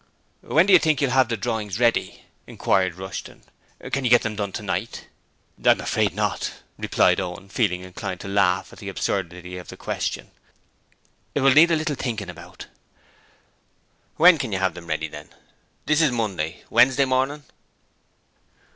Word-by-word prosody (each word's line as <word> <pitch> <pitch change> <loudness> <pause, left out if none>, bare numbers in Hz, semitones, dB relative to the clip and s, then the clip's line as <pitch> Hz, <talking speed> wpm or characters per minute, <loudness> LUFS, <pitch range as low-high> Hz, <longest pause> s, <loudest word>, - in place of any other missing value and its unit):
'When 165 +3 +3
do 200 - +4
you 180 - +9
think 155 -2 +1
you'll 140 -4 +1
have 130 -2 +3
the 115 - -1
drawings 110 -2 -3
ready?' 120 -1 +1 0.2
inquired 95 -3 0
Rushton. 95 +1 -8 0.5
'Can 135 - -1
you 125 - +1
get 120 0 +5
them 110 -1 -3
done 100 -1 -3
tonight?' 105 +1 -4 0.6
'I'm - - +5
afraid - - 0
not,' - - -2 0.3
replied - - +2
Owen, 95 +1 -6
feeling 95 -5 0
inclined 95 0 -6
to - - -7
laugh 95 -2 +1
at - - -14
the - - -6
absurdity 90 -1 -3
of 90 - -12
the - - -10
question. - - -4 1.0
'It 145 - +1
will 135 0 +5
need 160 +4 +7
a 165 - +3
little 155 -2 -1
thinking 110 -8 -4
about.' 85 - -12 1.5
'When 170 0 +6
can 125 -5 -3
you 95 - 0
have 95 -2 0
them 85 -1 -11
ready 80 0 -2
then? 75 0 -11 0.6
This 150 +1 +3
is 155 -4 +3
Monday. 95 -9 -3
Wednesday 130 +3 +4
morning?' 135 +3 0
110 Hz, 165 wpm, -23 LUFS, 95-135 Hz, 1.5 s, you